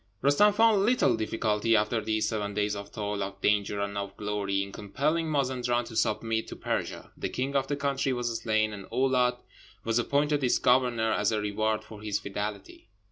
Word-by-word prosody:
Roostem 145 +10 +5
found 220 -1 +4
little 235 - +3
difficulty 110 0 +1
after 110 +2 +1
these 110 0 0
seven 105 -2 -3
days 105 0 0
of 100 0 -8
toil, 105 -1 -3
of 100 0 -5
danger, 105 0 +1
and 100 0 -3
of 100 -1 -6
glory, 100 -1 -1
in 100 - -8
compelling 150 +12 -1
Mazenderan 125 -4 0
to 115 - -10
submit 110 +1 0
to - - -7
Persia. - - -4
The - - -3
king 135 +2 -3
of 135 -1 +1
the 145 - -1
country 140 -1 0
was 120 -2 -2
slain, 110 -1 +1
and 100 -2 -8
Oulâd 125 -2 +2 0.5
was 115 +1 +1
appointed 145 +3 +1
its 125 - +3
governor 125 -3 +2
as 105 -1 +1
a 110 - 0
reward 110 +1 -1
for 105 -2 -12
his 105 -2 -1
fidelity. 105 +2 -6
110 Hz, 190 wpm, -28 LUFS, 105-130 Hz, 0.5 s, Roostem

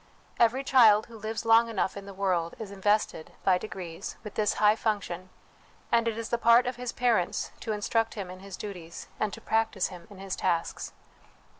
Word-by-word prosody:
Every 240 +3 +3
child 225 -6 +6
who 230 -1 -12
lives 220 +2 -4
long 230 +1 +5
enough 195 -4 -1
in 200 0 -8
the 200 - -8
world 180 -4 0
is 215 -3 -7
invested, 200 -4 0
by 185 -2 +4
degrees, 180 -5 -7
with 210 - -8
this 210 -1 +1
high 210 0 +5
function, 195 -5 -2 0.6
and 230 0 +3
it 225 -1 -1
is 230 0 -4
the 235 - 0
part 235 +2 +6
of 250 0 -2
his 245 0 -4
parents 235 -8 0
to 225 - -4
instruct 225 +2 0
him 195 -4 -5
in 185 - -10
his 195 0 -9
duties, 175 -5 -8
and 215 - 0
to - - -8
practise 220 -4 0
him 175 -2 -11
in 200 - -13
his 195 -1 -4
tasks. 165 -1 -1
210 Hz, 195 wpm, -28 LUFS, 190-225 Hz, 0.6 s, child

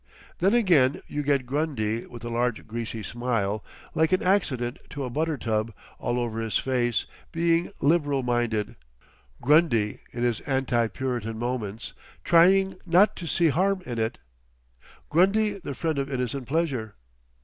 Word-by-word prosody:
Then 195 +6 +3
again 165 - +3
you 150 - -3
get 140 -3 +1
Grundy 125 -6 -1
with 120 -1 -11
a - - -3
large 120 -1 -1
greasy 115 -1 -5
smile—like 120 - -2
an 185 - +2
accident 135 -11 +1
to 145 - -5
a 125 - -4
butter 155 +3 -1
tub—all 110 +1 -3
over 115 -2 -2
his 115 -1 0
face, 120 -3 0 0.3
being 170 +1 +1
Liberal 145 -3 +2
Minded—Grundy 110 - 0
in 120 - -3
his 120 -2 +1
Anti 130 -4 0
Puritan 120 -3 -3
moments, 115 -3 -4 0.3
'trying 190 +3 +5
not 180 +5 +5
to 170 - -6
see 165 +2 +3
Harm 185 +4 +1
in 120 -4 -4
it'—Grundy 110 - -2
the 140 -6 -6
friend 160 -1 -1
of 140 0 -3
innocent 125 0 -3
pleasure. 135 -8 -1
125 Hz, 135 wpm, -26 LUFS, 115-160 Hz, 0.3 s, trying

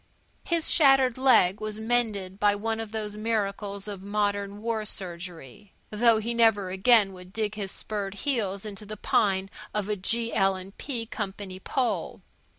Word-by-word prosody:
His 335 -4 +1
shattered 270 -5 +5
leg 220 -8 +4
was 215 0 -4
mended 220 -5 -1
by 205 0 +4
one 225 +2 -2
of 225 -2 -5
those 210 -1 -3
miracles 205 -2 -2
of 200 -2 -6
modern 205 0 -1
war 225 0 -2
surgery, 180 -2 -5 0.2
though 225 +1 +4
he 225 +2 -2
never 220 -5 +3
again 195 +1 +4
would 180 0 -12
dig 215 0 -1
his 200 -3 -4
spurred 205 -2 -4
heels 205 -6 -1
into 210 0 -7
the 215 +1 -6
pine 195 -2 +1 0.3
of 210 -2 -1
a 210 - +1
G.L. 195 -2 0
& - - -34
P. 240 -5 -3
Company 195 -3 -6
pole. 245 +4 -2
210 Hz, 155 wpm, -27 LUFS, 195-225 Hz, 0.3 s, shattered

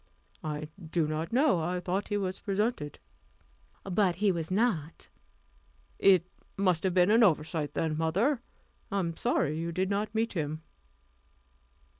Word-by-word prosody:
"I 150 0 -4 0.2
do 160 0 0
not 155 +2 -3
know. 260 - +3
I 175 +3 -1
thought 185 +3 -2
he 205 - -1
was 190 -2 -2
presented." 200 -7 -1 0.9
"But 190 -1 +1
he 200 +2 +2
was 165 -3 -3
not." 185 -6 -1 0.9
"It 185 -3 +5 0.3
must 185 -4 +2
have 185 -1 0
been 180 +2 +5
an 225 +2 +5
oversight 155 - +1
then, 160 -1 0
mother; 205 - +1 0.5
I 200 - 0
am 170 -4 -1
sorry 160 - 0
you 170 +1 -2
did 185 +3 -1
not 210 +2 -1
meet 225 +1 0
him." 155 -2 -3
180 Hz, 145 wpm, -29 LUFS, 160-205 Hz, 0.9 s, It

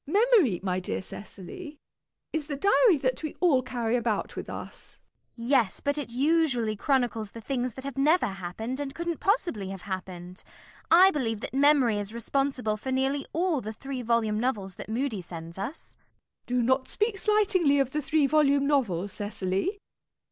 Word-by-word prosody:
Memory, 400 - +4
my 185 -1 0
dear 185 - -3
Cecily, 215 - -9 0.6
is 310 -2 -2
the 295 - -3
diary 400 - +5
that 255 -2 -1
we 310 -2 -5
all 310 -8 +4
carry 240 -2 -1
about 230 -4 -1
with - - -6
us. - - -9 0.4
CECILY. 235 0 -7
Yes, 245 -9 +3
but 285 +1 -1
it 285 - -5
usually 260 -4 +1
chronicles 235 -4 0
the 230 - -8
things 250 0 -3
that 265 - -8
have 275 -1 -5
never 310 +4 +4
happened, 200 +5 -5
and 275 -1 -4
couldn't 340 -1 -3
possibly 345 - 0
have 195 -2 -7
happened. 185 -1 -6 0.5
I 370 +3 +8
believe 230 - -1
that - - -5
Memory 270 -6 +4
is 205 +2 -5
responsible 250 -2 -1
for 260 +5 -5
nearly 270 +2 0
all 335 -4 +1
the 220 0 -5
three 270 +3 -6
volume 225 -2 +1
novels 210 -6 -1
that - - -8
Mudie 230 -3 -1
sends 165 +1 -8
us. 245 +11 -6
MISS - - -42
PRISM. - - -39 0.5
Do - - +3
not 260 +2 +2
speak 425 -1 -1
slightingly 390 -9 +3
of 270 -2 +1
the 300 - -1
three 300 +1 +2
volume 280 -1 +3
novel, 225 - +1
Cecily. 205 - -2
260 Hz, 175 wpm, -27 LUFS, 215-295 Hz, 0.6 s, I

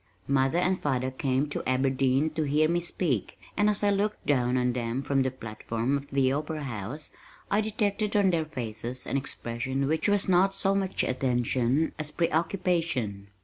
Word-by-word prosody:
Mother 135 +3 +2
and 185 +1 +1
father 130 -2 0
came 130 +2 0
to - - -2
Aberdeen 135 +3 +2
to 160 +1 -2
hear 150 +1 +3
me 170 +2 +1
speak, 165 - -2 0.2
and 210 0 +3
as 210 0 0
I 205 - +4
looked 205 +1 -1
down 125 -3 +2
on 125 -1 +1
them 120 +2 -2
from 140 -1 +1
the 130 - +1
platform 115 +1 -3
of 140 0 -4
the 135 -1 +2
opera 150 +2 -2
house, 130 +4 -6 0.4
I 205 +2 +3
detected 210 -1 -1
on 200 -2 +4
their 165 -2 0
faces 120 -3 -4
an - - -3
expression 135 0 -2
which 160 +7 +1
was 205 -1 +2
not 190 +1 +3
so 195 0 +1
much 195 -1 0
attention, 125 +2 +1
as 155 -1 -2
preoccupation. 165 - 0
140 Hz, 175 wpm, -28 LUFS, 130-175 Hz, 0.4 s, I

